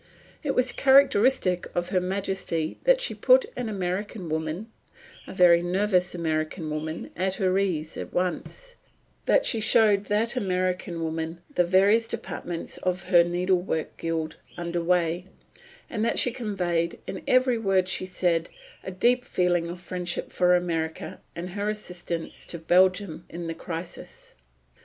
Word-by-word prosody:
It 280 -2 -2
was 250 -1 +3
characteristic 260 -9 +4
of 175 0 -1
Her 185 - +1
Majesty 190 -4 -2
that - - +5
she - - -1
put - - +5
an 240 -3 -3
American 190 -1 -3
woman 160 +8 -3 0.6
a - - -8
very 175 -2 +6
nervous 180 0 +1
American 155 -1 -2
woman 155 +1 -4
at 190 +2 -1
her 190 -2 +1
ease 165 -5 -1
at - - -6
once, 185 - -3 0.5
that - - +4
she 230 - +2
showed 210 -2 +4
that 220 +5 0
American 185 -5 -1
woman 160 +1 -4
the 180 - +3
various 200 +6 +4
departments 175 -4 -5
of 185 0 -2
her 175 -2 +7
Needlework 175 -1 -1
Guild 160 -1 -3 0.2
under 175 0 -2
way, 175 +1 +1 0.6
and 215 -2 -3
that 230 - +1
she 245 - +3
conveyed, 180 -8 -1
in - - -6
every 255 -2 +3
word 195 -3 +2
she 185 0 -2
said, 175 -2 0 0.3
a - - -5
deep 245 +7 +2
feeling 175 -6 +1
of 175 +1 -7
friendship 180 -1 -4
for 180 0 +4
America 165 -2 -3
and 175 +2 -5
her 205 +2 -2
assistance 175 -5 -5
to 170 - -5
Belgium 185 +1 +2
in 170 0 -6
this 165 0 -4
crisis. 165 +1 -8
180 Hz, 145 wpm, -26 LUFS, 170-205 Hz, 0.6 s, her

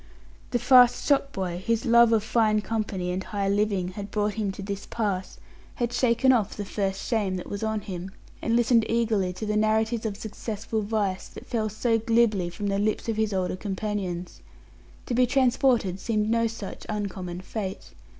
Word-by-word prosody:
The 245 - +1
fast 245 0 +6
shopboy 195 -11 0
whose 230 +6 -1
love 235 -1 +6
of 220 -2 +3
fine 220 -1 +2
company 210 -5 -2
and 185 +1 -2
high 200 -1 -2
living 200 -2 +1
had 200 +2 -7
brought 210 0 0
him 210 -2 -1
to 195 - -7
this 200 0 -5
pass, 200 -5 -2 0.4
had 240 0 -2
shaken 245 +1 +3
off 220 -5 +1
the 205 - -3
first 195 -1 -2
shame 205 -5 0
that 180 - -6
was 200 - -4
on 220 -1 -1
him, 190 -2 -6 0.3
and 230 - +1
listened 235 -1 +4
eagerly 220 -5 +1
to 215 - -5
the 210 0 -1
narratives 220 +1 +1
of 200 -2 -5
successful 220 0 -4
vice 205 -3 -1
that - - -11
fell 220 -2 -1
so 225 +2 +1
glibly 220 -5 +2
from 190 +4 -6
the 200 0 0
lips 215 +2 0
of 220 - -1
his 220 -1 +1
older 185 -2 -1
companions. 190 -3 -4 0.6
To - - -3
be 250 +1 +4
transported 250 -7 +2
seemed 215 0 0
no 230 0 +3
such 220 -3 -7
uncommon 190 -4 -4
fate. 195 0 -5
215 Hz, 180 wpm, -26 LUFS, 195-230 Hz, 0.6 s, fast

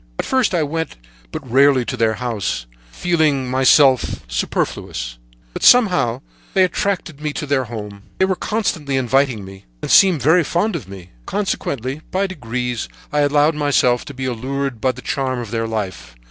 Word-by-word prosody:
At - - -2
first 260 -8 +1
I 165 - +2
went 160 +2 -3 0.4
but 135 - -7
rarely 135 0 +4
to 125 - -3
their 110 -2 +1
house, 105 - -3 0.3
feeling 155 - +1
myself 130 - +3
de - - -1
trop. - - +1 0.9
But, - - -6
somehow, 180 - +4 0.3
they 190 - +5
attracted 185 -5 -2
me 150 -1 -2
to 150 - -4
their 140 -2 0
home; 105 -3 -7 0.2
they 190 - +3
were 190 0 0
constantly 165 -11 -1
inviting 130 -4 +1
me, 95 0 -12 0.2
and - - -2
seemed 180 - +6
very 165 +5 +5
fond 175 +6 0
of 130 - -5
me. 95 -2 -11 0.2
Consequently, 140 - -2
by 190 +2 0
degrees, 125 - -4 0.2
I 150 - +2
allowed 145 +2 +3
myself 145 -5 +2
to 140 - -8
be 130 0 -4
allured 130 0 -3
by 130 - +2
the 125 0 -12
charm 130 -2 -1
of 120 -3 -6
their 115 -1 -1
life. 100 - -5
135 Hz, 175 wpm, -19 LUFS, 120-160 Hz, 0.9 s, seemed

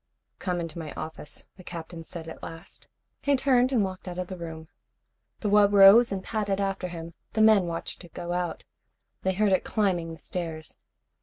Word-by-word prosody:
"Come 180 -2 -1
into 165 -1 -5
my 155 -3 -6
office," 155 -1 -6
the 185 - -12
Captain 165 -1 -7
said 165 0 -8
at 160 - -9
last. 165 +3 -10 0.3
He 285 0 +3
turned 255 -1 +3
and 235 -6 +3
walked 185 -1 -5
out 180 -1 -5
of 180 -1 -3
the 190 - -5
room. 160 -2 -7 0.7
The 215 - -1
wub 205 -1 +5
rose 200 +4 +8
and 190 -1 -3
padded 205 -3 -1
after 195 -2 -1
him. 170 -1 -7 0.2
The 220 - +2
men 215 -4 +6
watched 165 +2 -4
it 175 - -14
go 175 0 -3
out. 175 -2 -2 0.6
They 190 - +1
heard 205 +1 +2
it 185 - +3
climbing 180 -6 0
the 165 - -8
stairs. 160 -2 -5
180 Hz, 190 wpm, -27 LUFS, 165-200 Hz, 0.7 s, rose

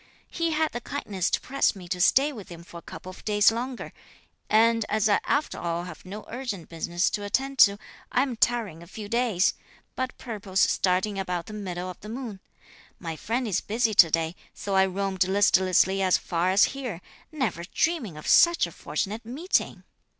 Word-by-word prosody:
He 335 -1 -1
had 315 0 0
the 240 - -5
kindness 205 -10 -3
to - - +1
press 275 -4 +1
me 185 -2 -10
to 180 0 -2
stay 275 +10 +4
with 205 -5 -10
him 170 -1 -10
for 170 - -11
a - - -9
couple 185 - -9
of - - -14
days 210 0 +4
longer, 245 +3 -5 0.6
and 230 +1 +4
as 215 -1 +2
I 205 - +3
after 290 +2 0
all 170 0 -2
have 175 -3 -10
no 205 +3 -8
urgent 235 -8 -5
business 170 +1 -1
to 205 - -3
attend 270 +6 -1
to, 200 -1 +7 0.3
I 255 - +3
am 260 -3 -3
tarrying 225 -8 0
a 170 - -12
few 210 +3 -8
days, 220 -4 +2 0.4
but 260 -1 -3
purpose 205 -5 -2
starting 190 +2 +1
about 180 -3 -3
the 215 - -9
middle 185 -4 -5
of 180 - -8
the 210 - -10
moon. 230 -4 -6 0.6
My 165 -3 -5
friend 235 +8 -2
is 195 -3 0
busy 225 +1 0
to 175 -5 +7
day, 165 +1 0 0.2
so 200 - -4
I 190 0 +4
roamed 190 -1 0
listlessly 190 -1 +3
as 185 -1 +4
far 175 +1 -1
as 195 +2 +5
here, 250 -10 -5 0.3
never 245 - -2
dreaming 240 - -1
of 155 - -10
such 340 0 +5
a - - -8
fortunate 215 +3 -4
meeting." 280 - -1
205 Hz, 195 wpm, -26 LUFS, 180-240 Hz, 0.6 s, to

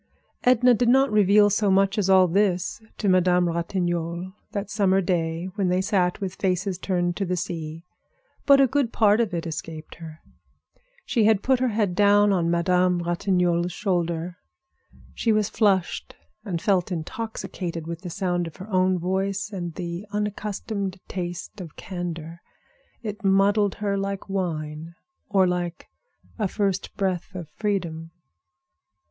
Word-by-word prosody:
Edna 250 0 +5
did 240 +1 +2
not 270 +2 +4
reveal 205 0 +5
so 205 0 +2
much 195 +1 +3
as 195 -2 +1
all 190 -1 +6
this 185 +2 0 0.2
to 205 - -2
Madame 180 -1 +4
Ratignolle 170 +1 -2 0.2
that 200 0 -4
summer 195 -2 +3
day 170 -2 -1
when 200 -2 0
they 180 +1 +2
sat 185 -2 +1
with 190 -2 -5
faces 190 0 0
turned 175 -2 -1
to 200 - -1
the 180 -1 -1
sea. 165 -2 -5 0.6
But 280 -1 +7
a 275 - +7
good 265 -2 0
part 210 0 +4
of 225 -4 -1
it 170 -2 -3
escaped 160 -1 -6
her. 160 -1 -10 0.9
She 225 -3 +2
had 215 -2 +3
put 260 -1 +3
her 255 - +2
head 210 -5 0
down 205 +1 +4
on 170 -3 +1
Madame 180 +1 +2
Ratignolle's 175 0 +1
shoulder. 175 -3 -2 0.8
She 230 - 0
was 215 -1 +2
flushed 195 -5 0 0.3
and 185 -6 -3
felt 190 -1 +1
intoxicated 175 -2 -5
with 170 0 -6
the 180 - -6
sound 175 -1 -1
of 165 - -10
her 190 +3 -10
own 185 0 +3
voice 195 +4 -2
and 175 -4 -5
the 175 +3 -5
unaccustomed 205 -1 -3
taste 175 +1 -5
of 165 -4 -10
candor. 170 -2 -6 0.6
It 210 0 -6
muddled 200 +1 +3
her 200 -1 -1
like 195 0 -4
wine, 165 -4 -4 0.3
or 195 -2 +4
like 175 -1 -3 0.5
a 210 - +1
first 195 -1 -2
breath 190 -1 -2
of 170 -4 -6
freedom. 170 -5 -3
185 Hz, 150 wpm, -24 LUFS, 175-205 Hz, 0.9 s, But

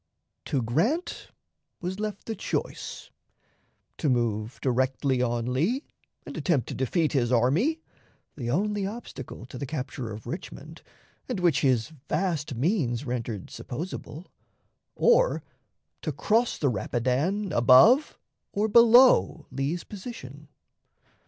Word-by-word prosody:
To 135 -4 -1
Grant 195 - -1 0.5
was 185 +2 -4
left 210 -1 -4
the 225 - -3
choice - - -4 0.9
to 150 - +1
move 115 -2 0
directly 130 0 +1
on 120 0 -1
Lee 210 - 0 0.4
and - - -8
attempt 145 - 0
to - - -4
defeat 155 +5 0
his 125 -4 +1
army, 160 - +2 0.5
the 120 -5 -4
only 200 +7 0
obstacle 215 - -8
to 125 0 -9
the 140 - -4
capture 130 -5 -5
of 105 0 -8
Richmond, - - -8 0.5
and - - -2
which 175 -6 +3
his 130 -4 +2 0.2
vast 160 -8 -1
means 135 - 0
rendered 115 -5 -4
supposable, 160 +3 -6 0.7
or - - +3 0.6
to - - -2
cross 225 +3 +1
the 140 - +1
Rapidan 130 - -1
above 135 - +6 0.4
or 210 +2 +1
below 235 - +6
Lee's 140 +6 -2
position. 155 - -9
145 Hz, 120 wpm, -27 LUFS, 125-205 Hz, 0.9 s, above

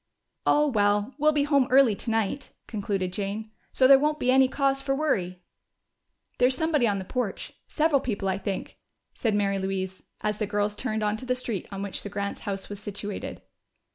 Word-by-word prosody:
"Oh, 295 0 +5
well, 205 -1 +2
we'll 305 +1 +5
be 295 -1 +2
home 280 -3 +3
early 260 -3 +6
tonight," 225 +4 -2 0.2
concluded 195 -4 -2
Jane. 210 +2 -4 0.2
"So 260 - +4
there 270 0 +8
won't 300 +1 +1
be 250 - +2
any 265 0 +6
cause 275 0 +1
for 270 0 0
worry." 185 -12 -1 1.0
"There's 255 +1 +3
somebody 305 -6 +2
on 200 -2 +1
the 190 - -5
porch 240 -2 -3
several 305 -3 +2
people, 210 -6 -2
I 190 0 0
think," 195 -1 -4 0.3
said 220 -3 0
Mary 200 -1 +1
Louise 190 -1 -3 0.2
as 210 -1 -1
the 210 - 0
girls 205 0 0
turned 220 -2 -2
into 215 +4 -2
the 250 - +2
street 235 -7 -4
on 195 0 -4
which 200 - -3
the 205 - -6
Grants' 200 0 -4
house 195 -1 -4
was 205 -1 -7
situated. 205 0 -6
215 Hz, 185 wpm, -27 LUFS, 200-265 Hz, 1.0 s, there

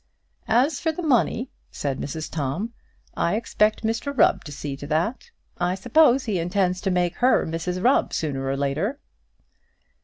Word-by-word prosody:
"As 260 +6 +2
for 320 - 0
the 345 +3 -6
money," 250 -3 +1 0.2
said 135 -2 -3
Mrs 155 +2 -4
Tom, 165 - -3 0.4
"I 170 - +1
expect 215 -1 +1
Mr 225 +6 -1
Rubb 190 -4 +4
to 150 - -8
see 140 0 -5
to 145 - -8
that. 170 - -1 0.3
I 180 +1 +1
suppose 270 +6 +4
he 205 -6 -1
intends 180 +1 0
to 195 - -1
make 180 -2 0
her 255 +1 +3
Mrs 180 +3 -3
Rubb 260 +3 +3
sooner 140 -4 -2
or 135 0 -1
later." 155 - -1
185 Hz, 160 wpm, -24 LUFS, 155-235 Hz, 0.4 s, Rubb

